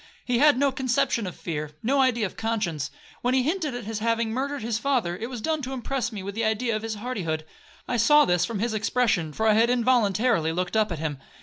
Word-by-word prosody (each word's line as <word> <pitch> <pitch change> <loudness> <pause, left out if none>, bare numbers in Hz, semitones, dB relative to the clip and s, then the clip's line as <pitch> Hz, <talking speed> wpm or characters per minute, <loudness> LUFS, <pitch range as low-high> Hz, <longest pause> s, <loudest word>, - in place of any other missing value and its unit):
He 245 -1 +1
had 295 -1 +6
no 280 +1 +3
conception 255 -4 0
of 180 - -6
fear,—no 155 - -2
idea 240 -4 +2
of 190 - -6
conscience. 205 -11 -2 0.3
When 250 +1 +1
he 260 - +3
hinted 310 -3 -1
at 245 - -5
his 220 +1 -4
having 230 0 0
murdered 275 +2 -2
his 225 -1 -1
father, 245 -10 0
it 225 +6 -5
was 245 -4 -6
done 315 +4 -1
to 265 0 -5
impress 260 -1 -2
me 205 -4 -6
with 200 +1 -6
an 230 - 0
idea 220 +1 0
of 215 - -2
his 225 0 -4
hardihood. 190 -9 -3 0.4
I 245 - 0
saw 295 +6 +6
this 180 -1 +2
from 215 +4 -2
his 225 +3 -1
expression, 215 -7 +1
for 220 +8 -2
I 215 - +6
had 225 +2 +4
involuntarily 230 -7 +2
looked 180 +3 -2
up 215 -2 +2
at 170 - -2
him. 150 -3 -3
225 Hz, 230 wpm, -25 LUFS, 200-255 Hz, 0.4 s, had